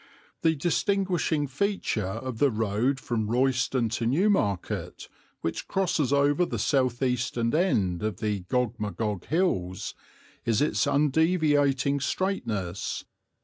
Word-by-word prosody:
The 160 0 +3
distinguishing 175 -1 0
feature 145 - -1
of 115 +4 -5
the 145 - +5
road 115 +4 0
from 110 -4 -2
Royston 125 0 +1
to 115 0 -1
Newmarket, 135 - 0 0.3
which 80 - -3
crosses 175 -8 0
over 145 +4 +3
the - - -2
south 130 -3 +1
eastern 120 -2 0
end 105 - +1
of 105 -3 -2
the 105 -2 -1
Gog 125 -2 0
Magog 105 -2 -3
Hills, 95 - -1 0.5
is 115 -2 +1
its 150 0 +1
undeviating 145 -2 +2
straightness. 110 - -2
130 Hz, 115 wpm, -27 LUFS, 110-155 Hz, 0.5 s, the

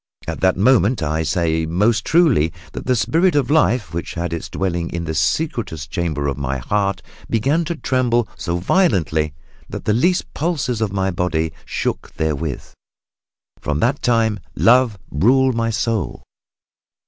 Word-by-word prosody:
At - - -4
that 95 -1 +2
moment, 110 -2 +3
I 80 +1 0
say 80 0 0
most 105 +6 +1
truly, 150 - +3 0.2
that - - -7
the 130 - +3
spirit 165 - +2
of 145 -1 +1
life, 125 - +2
which 85 - -4
hath 85 0 -3
its 85 - -5
dwelling 85 -3 -2
in 85 0 -4
the 80 -1 -3
secretest 80 - -1
chamber 80 -5 -2
of 70 - -2
the 70 0 -1
heart, 100 +5 -1 0.3
began 135 +9 +1
to 170 - -3
tremble 125 -6 +1
so 85 -2 -2
violently 85 - +1 0.3
that - - -7
the 105 - +2
least 175 - +1
pulses 145 -8 -1
of 110 -3 0
my 95 -1 0
body 80 -3 -1
shook - - -3
therewith. 80 -2 -2 1.0
From 75 0 -2
that 135 +4 +1
time 115 -3 +2 0.2
Love 115 +3 +4
ruled 130 - +3
my 115 0 0
soul." 115 -2 -2
100 Hz, 155 wpm, -20 LUFS, 80-125 Hz, 1.0 s, Love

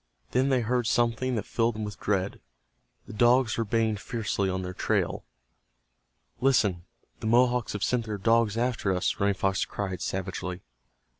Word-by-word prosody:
Then 130 +2 +2
they 130 -2 +3
heard 120 0 0
something 120 +1 +1
that 105 - -2
filled 115 -1 0
them 110 - -4
with 105 -1 -6
dread. 100 -1 -1 0.6
The - - -10
dogs 120 +1 +4
were 115 - 0
baying 110 0 +1
fiercely 105 -2 -2
on 95 0 -2
their 90 0 -5
trail. - - -1 1.1
"Listen, 105 -10 +2 0.3
the - - -4
Mohawks 125 +1 +3
have 105 - -3
sent 120 -2 +1
their 105 -1 -3
dogs 115 +1 +2
after 120 -4 0
us," 90 - -1
Running 100 0 +2
Fox 95 0 0
cried, 95 -4 -4
savagely. 95 -1 -4
110 Hz, 160 wpm, -27 LUFS, 100-120 Hz, 1.1 s, dogs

